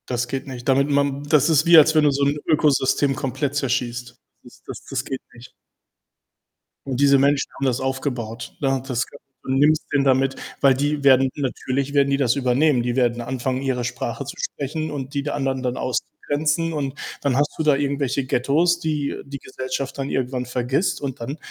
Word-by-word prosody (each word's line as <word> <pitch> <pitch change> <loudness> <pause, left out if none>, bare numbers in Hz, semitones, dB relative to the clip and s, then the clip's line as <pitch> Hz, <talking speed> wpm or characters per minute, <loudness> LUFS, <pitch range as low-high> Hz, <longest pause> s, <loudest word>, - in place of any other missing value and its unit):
Das 120 -1 -1
geht 135 +2 -4
nicht. 125 -2 -8
Damit 140 +1 +3
man 140 0 +1
das 145 +1 +3
ist 155 -1 +3
wie 170 0 +8
als 155 +1 +6
wenn 155 - +5
du 145 - +5
so 140 +1 0
'n 145 +1 +1
Ökosystem 145 -3 +2
komplett 135 +1 -2
zerschießt. 125 -3 -2 0.3
Das - - -17
Das - - -8
Das - - -3
geht 135 - -5
nicht. 120 +1 -14 1.4
Und 130 -2 -2
diese 140 -1 +5
Menschen 140 +1 +2
haben 135 - -4
das 125 -1 +1
aufgebaut. 130 -4 -4
Da 135 -1 +1
das 130 -1 -2
ga 140 - -13 0.3
du - - -4
nimmst 150 +3 +3
denen 145 -1 +2
damit, 135 0 +2 0.3
weil 135 -2 +5
die 145 +2 -1
werden 135 -1 +5
natürlich 135 0 -2
werden 140 -1 +4
die 140 - +2
das 130 -3 +2
übernehmen. 130 0 +2
Die 120 0 -1
werden 120 -2 +1
anfangen, 130 +1 -2
ihre 130 -2 -1
Sprache 125 - -4
zu - - -7
sprechen 155 +3 -4
und 140 -1 -6
die 140 - 0
der 145 - -3
anderen 135 -2 -2
dann 125 -1 -2
auszugrenzen, 150 +5 -1
und 140 -3 -2 0.3
dann 140 -3 +1
hast 145 +2 +1
du 160 - -1
da 150 -2 +4
irgendwelche 140 -1 -1
Ghettos, 155 +8 +2
die 150 -4 -2
die 140 0 -7
Gesellschaft 130 +1 -5
dann 135 0 -3
irgendwann 125 -1 -2
vergisst 125 +7 -1
und 140 -1 -4
dann 135 +6 -5
135 Hz, 195 wpm, -22 LUFS, 130-145 Hz, 1.4 s, wie